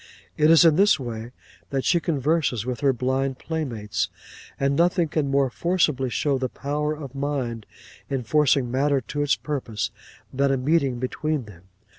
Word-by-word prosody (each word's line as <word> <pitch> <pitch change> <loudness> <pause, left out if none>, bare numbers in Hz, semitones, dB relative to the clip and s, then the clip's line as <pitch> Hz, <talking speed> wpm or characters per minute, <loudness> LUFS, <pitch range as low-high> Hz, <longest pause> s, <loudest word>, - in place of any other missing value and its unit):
It 150 0 +3
is 165 +1 +7
in 160 -2 +5
this 200 -4 +5
way 115 -2 -5 0.4
that 135 -1 -2
she 175 - +3
converses 145 -7 0
with 125 -2 -3
her 140 -2 +3
blind 130 +1 -1
playmates, 110 - -3 0.5
and 140 0 +1
nothing 175 +1 +2
can 150 -3 0
more 135 -2 +2
forcibly 155 -6 +1
show 140 +2 0
the 130 -1 -1
power 150 +3 -2
of 140 -4 -8
mind 135 -5 -3 0.4
in 135 -2 -2
forcing 140 -1 +2
matter 140 +2 +2
to 140 +5 -4
its 145 -1 +2
purpose 115 -9 -3 0.4
than 140 +1 +2
a 135 - +2
meeting 135 -1 +1
between 135 +2 -2
them. 95 -4 -15
135 Hz, 165 wpm, -24 LUFS, 125-150 Hz, 0.5 s, is